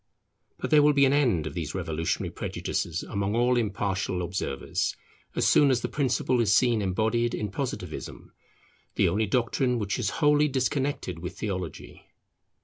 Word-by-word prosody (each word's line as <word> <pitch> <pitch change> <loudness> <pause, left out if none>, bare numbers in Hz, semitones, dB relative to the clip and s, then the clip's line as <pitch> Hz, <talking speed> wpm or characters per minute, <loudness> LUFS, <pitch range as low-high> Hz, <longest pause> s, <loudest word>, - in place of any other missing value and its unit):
But - - -4
there 150 -1 +7
will 150 0 +5
be 140 -1 +5
an 135 - +3
end 120 - +2
of 80 - -5
these 80 -1 -4
revolutionary 80 -3 -2
prejudices - - -3
among 100 +1 -2
all 120 +1 +3
impartial 100 -4 -1
observers 85 -6 -2 0.4
as - - +2
soon 145 - +5
as 125 -3 +2
the - - -1
principle 130 -3 +1
is 105 -3 +2
seen 120 -1 +3
embodied 110 +5 0
in 105 -2 -3
Positivism, - - -5 0.6
the - - +3
only 105 +5 +1
doctrine 125 +3 +1
which 105 0 -2
is 110 -5 0
wholly 150 -1 +4
disconnected 130 - -1
with 90 +2 -7
Theology. 95 -6 -6
110 Hz, 155 wpm, -27 LUFS, 95-130 Hz, 0.6 s, there